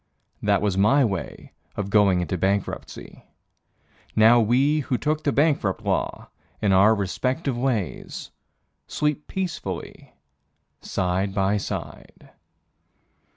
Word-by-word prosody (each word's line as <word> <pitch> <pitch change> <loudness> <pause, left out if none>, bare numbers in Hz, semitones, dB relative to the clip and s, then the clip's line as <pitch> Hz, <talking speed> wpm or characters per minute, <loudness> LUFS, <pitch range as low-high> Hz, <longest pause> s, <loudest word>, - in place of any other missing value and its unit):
That 105 0 +2
was 95 -2 0
my 125 +7 +4
way 95 -5 -5 0.2
of 100 -1 -4
going 100 -4 +4
into 90 - -2
bankruptcy. 95 +2 -3 0.9
Now 115 +2 +6
we 130 +7 +3
who 130 -3 -1
took 150 +7 -1
the 145 - +1
bankrupt 140 - +1
law - - -2 0.3
in 100 -2 +2
our 100 +4 +5
respective 125 - -2
ways 120 - -3 0.6
Sleep 150 0 -2
peacefully 185 -4 -5 0.7
side 95 +2 -1
by 95 +1 +2
side. 100 - -7
105 Hz, 110 wpm, -24 LUFS, 95-135 Hz, 0.9 s, Now